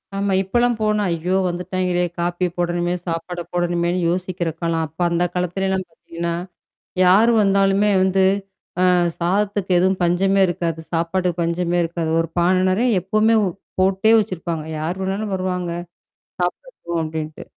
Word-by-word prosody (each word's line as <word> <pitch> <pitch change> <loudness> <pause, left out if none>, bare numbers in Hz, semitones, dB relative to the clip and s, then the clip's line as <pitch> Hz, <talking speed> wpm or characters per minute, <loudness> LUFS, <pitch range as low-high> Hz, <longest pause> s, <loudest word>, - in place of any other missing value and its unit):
ஆமா. 200 0 0
இப்பலாம் 240 +4 +1
போனா, 210 -1 +1
ஐயோ 180 +3 0
வந்துட்டாயங்களே! 180 0 -1 0.2
காப்பியப் 175 0 -1
போடணுமே, 175 0 0
சாப்பாடப் 170 +1 -4
போடணுமேன்னு 175 0 0
யோசிக்கிற 180 -1 -2
காலம். 165 -1 0
அப்ப 160 +3 -30
அந்த 170 +1 +1
காலத்துலலாம் 185 +1 -1
பாத்தீங்கன்னா, 170 +1 -5 0.7
யார் 200 +6 +5
வந்தாலுமே 195 0 +3
வந்து 190 0 +2 0.7
அ - - +5 0.3
சாதத்துக்கு 195 +2 0
எதுவும் 190 +1 +2
பஞ்சமே 190 +3 +2
இருக்காது. 170 -2 -2
சாப்பாட்டுக்கு 175 +1 0
பஞ்சமே 175 +1 0
இருக்காது. 165 -1 -3
ஒரு 165 - -2
பான 175 +2 +3 0.2
நிறைய 215 +1 +2
எப்பவுமே 215 +5 +2 0.4
போட்டே 190 +3 +3
வச்சிருப்பாங்க. 170 -5 -2 0.2
யார் 165 +4 -2
வேணாலும் 195 +2 -2
வருவாங்க. 180 -2 -2 0.7
சாப்பிடட்டும் 175 - -3
அப்பிடின்ட்டு. 155 -1 -5
180 Hz, 125 wpm, -21 LUFS, 170-195 Hz, 0.7 s, யார்